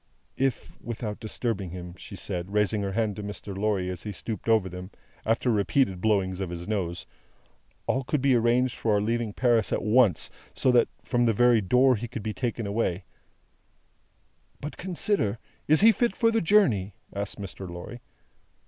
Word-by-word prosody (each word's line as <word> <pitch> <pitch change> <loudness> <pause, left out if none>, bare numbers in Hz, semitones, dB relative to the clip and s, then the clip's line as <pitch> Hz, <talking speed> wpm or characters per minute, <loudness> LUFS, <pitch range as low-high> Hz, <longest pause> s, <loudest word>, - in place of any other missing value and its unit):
"If, 135 -1 -2
without 115 -2 -5
disturbing 110 -4 -3
him," 90 0 -7
she 100 - -10
said, 90 0 -4
raising 105 0 +1
her 100 -1 -2
hand 110 -1 0
to 105 - -5
Mr. 100 -1 -6
Lorry 100 -2 0
as 90 - -6
he 105 - -5
stooped 110 +3 -5
over 110 -4 +4
them, 90 +1 -7 0.4
after 115 +2 +2
repeated 100 -2 +1
blowings 95 -3 +1
of 95 - -2
his 85 0 -6
nose, 90 -5 -2 0.8
"all 130 - 0
could 150 +3 0
be 135 0 +3
arranged 120 +2 +2
for 110 - 0
our - - +3
leaving 115 +1 -1
Paris 120 0 +2
at - - 0
once, 110 - +3 0.2
so 130 - +3
that, 120 -1 +5 0.2
from 120 -2 +1
the 115 - +3
very 120 0 +4
door, 125 +7 +4
he 120 +2 -4
could 115 -2 -6
be 110 0 -2
taken 115 +3 -2
away 100 -3 -1 0.8
" - - -41
"But, 150 - -6
consider. 175 - -1 0.3
Is 155 +4 +5
he 225 +2 +8
fit 235 -2 0
for 230 -1 +3
the 225 - +2
journey?" 120 - +3 0.2
asked 100 +1 -4
Mr. 95 -1 -7
Lorry. 90 +8 -8
110 Hz, 180 wpm, -27 LUFS, 95-120 Hz, 0.8 s, he